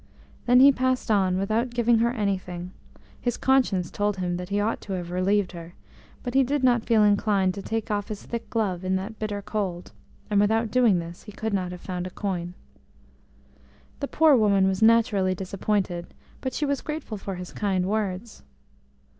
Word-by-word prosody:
Then 250 +1 +6
he 280 +1 +9
passed 255 -2 0
on, 190 -3 +2
without 220 +6 0
giving 235 -1 +2
her 235 +1 +3
anything; 185 -6 -3 0.5
his 245 -2 -1
conscience 230 -10 +2
told 205 -1 -1
him 175 -1 -2
that 180 +1 -6
he 200 +1 0
ought 215 +2 -1
to 195 - -6
have 175 -2 -4
relieved 190 +2 +1
her, 170 -1 -10 0.5
but 245 - -4
he 270 - +5
did 280 +1 -1
not 240 -3 +3
feel 225 -3 +4
inclined 205 -2 +2
to 200 - -6
take 220 +2 -3
off 205 -1 -1
his 210 -2 -6
thick 235 -1 -5
glove 195 -6 -1
in 185 0 0
that 200 +4 -5
bitter 205 -2 -3
cold, 190 -5 -3 0.4
and 205 -2 +3
without 220 +1 +1
doing 240 -7 +4
this 170 0 -6
he 210 - -11
could 220 +1 -4
not 185 -2 -1
have 180 - -8
found 180 -1 -4
a - - -6
coin. 180 -3 -4 1.4
The 280 - -2
poor 310 -1 +5
woman 200 -4 +3
was 190 +2 -1
naturally 220 -4 +4
disappointed, 190 -1 -2 0.3
but 260 - -3
she 300 - -1
was 280 -1 -1
grateful 300 -9 -5
for 195 -1 -5
his 180 0 -8
kind 190 -3 0
words. 205 +1 -3
205 Hz, 190 wpm, -25 LUFS, 185-230 Hz, 1.4 s, he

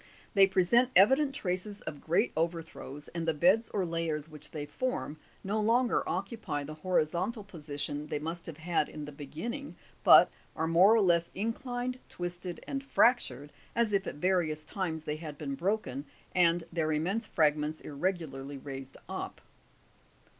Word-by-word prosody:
They 195 -1 +7
present 195 +6 +4
evident 265 +9 +5
traces 200 0 -3
of 145 - -7
great 175 +9 +2
overthrows, 165 -3 -3
and 165 -1 -4
the 160 - +2
beds 190 +9 +4
or 195 -3 0
layers 165 -3 -2
which 150 -2 -6
they 150 -2 -5
form 250 - -3 0.3
no 210 +3 0
longer 235 +3 +3
occupy 195 -5 -3
the 150 +2 -7
horizontal 180 +6 0
position 150 -5 -5
they 150 - -2
must 165 +3 -5
have 165 -3 -7
had 165 -1 0
in 150 -1 -7
the 150 - -8
begin 150 - -5
ning, 280 +3 -7 0.3
but - - +8 0.2
are 160 - 0
more 180 +7 +6
or 225 - +4
less 170 -3 +3
inclined, 245 +4 -2
twisted 175 0 -5
and 275 0 -3
fractured, 150 - +2 0.2
as 230 -3 +2
if 195 -1 +1
at - - -4
various 155 -2 0
times 165 -5 -3
they 150 -1 -3
had 155 -2 -7
been 140 -2 -4
broken 155 -5 -1 0.3
and 170 -1 +4
their 160 -2 0
immense 190 +9 0
fragments 150 -1 +1
irregularly 145 -4 -3
raised 135 -1 -8
up. - - -5
170 Hz, 160 wpm, -31 LUFS, 150-205 Hz, 0.3 s, but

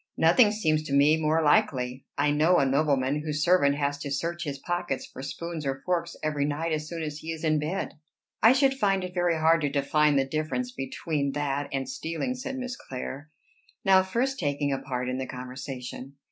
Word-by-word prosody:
"Nothing 205 +7 +5
seems 155 -8 +1
to 140 - -4
me 145 +2 +6
more 160 0 +1
likely. 135 -8 +1
I 145 +1 +2
know 160 +5 +4
a 140 - +3
nobleman 140 0 +1
whose 150 -1 -2
servant 155 -5 +4
has 145 0 -1
to 145 - -5
search 170 +5 -2
his 140 -2 -3
pockets 175 -2 -3
for - - -10
spoons 165 +3 -5
or 135 -1 -3
forks 170 -2 -1
every 150 -2 0
night 150 +3 -1
as 155 -1 -2
soon 165 -2 -4
as 150 -1 -5
he 160 +1 -5
is 160 -1 -6
in 155 -1 +2
bed." 155 0 -3 0.4
"I 225 - +7
should 270 0 +3
find 195 -7 +1
it 180 0 -6
very 175 -2 +1
hard 160 +1 +4
to 145 - +1
define 145 +1 +2
the 135 -1 +3
difference 155 - -2
between 140 - -2
that 145 -1 -2
and 135 -1 -2
stealing," 165 +10 -3
said 265 +1 -5
Miss 255 -1 -4
Clare, 135 - -7 0.6
now 190 -1 +6
first 245 +8 -1
taking 145 -2 0
a 135 - -1
part 125 -2 -3
in 130 +1 -2
the 130 - -3
conversation. 125 +1 -7
155 Hz, 200 wpm, -27 LUFS, 140-175 Hz, 0.6 s, I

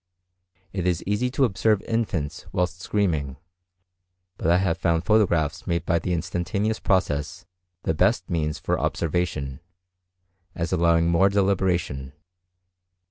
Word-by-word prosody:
It 90 -2 -1
is 85 -2 0
easy 105 +5 0
to 135 +1 +2
observe 105 -1 +1
infants 105 -10 -2
whilst 90 0 -1
screaming; 80 -11 -1 1.0
but 85 - -1
I 85 - +5
have 90 -1 0
found 85 -2 +1
photographs 85 -9 +2
made 85 -1 -1
by 85 -1 +2
the 90 - -3
instantaneous 90 +5 -1
process 75 -6 0 0.4
the - - +1
best - - +2
means 75 -3 -1
for - - -1
observation, 75 -5 -1 1.0
as 85 +1 -2
allowing 85 -1 +3
more 85 +4 +4
deliberation. 90 -9 0
90 Hz, 125 wpm, -24 LUFS, 80-100 Hz, 1.0 s, I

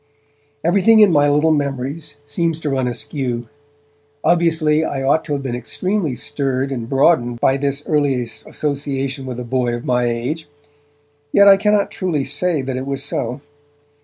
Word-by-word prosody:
Everything 200 +6 +4
in 210 -3 +7
my 145 -2 +4
little 150 +2 +3
memories 145 +1 -2
seems 165 +2 -1
to 150 -3 -3
run 130 -2 0
askew; 120 -1 -3 0.8
obviously 160 -2 +3
I 135 -3 -3
ought 145 +4 +2
to 150 - -3
have 140 -1 -2
been 130 -3 -3
extremely 160 - -2
stirred 135 +1 -2
and 120 -3 -4
broadened 135 -4 +2
by 135 +3 +3
this 140 +1 -2
earliest 135 -6 -1
association 140 -2 -3
with 125 -1 -5
a 125 - -5
boy 120 -1 0
of 120 - -7
my 125 -1 +1
own - - +1
age! 150 +7 -4 0.8
Yet 200 0 +6
I 195 - +9
cannot 210 0 +1
truly 160 -8 -2
say 150 +1 0
that 130 -1 -3
it 130 +1 -5
was 140 0 -2
so. 125 +3 -3
140 Hz, 165 wpm, -19 LUFS, 130-160 Hz, 0.8 s, I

